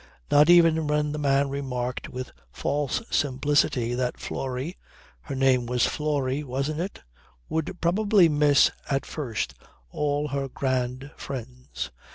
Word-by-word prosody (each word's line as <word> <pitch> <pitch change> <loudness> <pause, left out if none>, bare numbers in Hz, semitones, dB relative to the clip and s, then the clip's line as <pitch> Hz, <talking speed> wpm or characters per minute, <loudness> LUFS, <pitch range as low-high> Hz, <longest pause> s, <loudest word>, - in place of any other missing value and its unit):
Not 150 +3 +6
even 165 -3 +6
when 150 0 +1
the 150 - -4
man 140 -1 +2
remarked 125 -3 -3
with 125 0 -6 0.2
false 145 - -1
simplicity 135 -3 +1
that 125 0 -2
Florrie 135 +6 -4 0.4
her 100 - -6
name 130 -2 +3
was 125 0 +2
Florrie 145 -2 -1
wasn't 140 +3 -2
it? 185 +4 -5 0.5
would 160 +3 -2
probably 195 +2 +4
miss 145 -2 +4 0.2
at 135 -1 0
first 125 -9 -3 0.4
all 145 0 -1
her 140 -1 -2
grand 130 +1 -2
friends. 125 - -6
140 Hz, 130 wpm, -26 LUFS, 130-150 Hz, 0.5 s, Not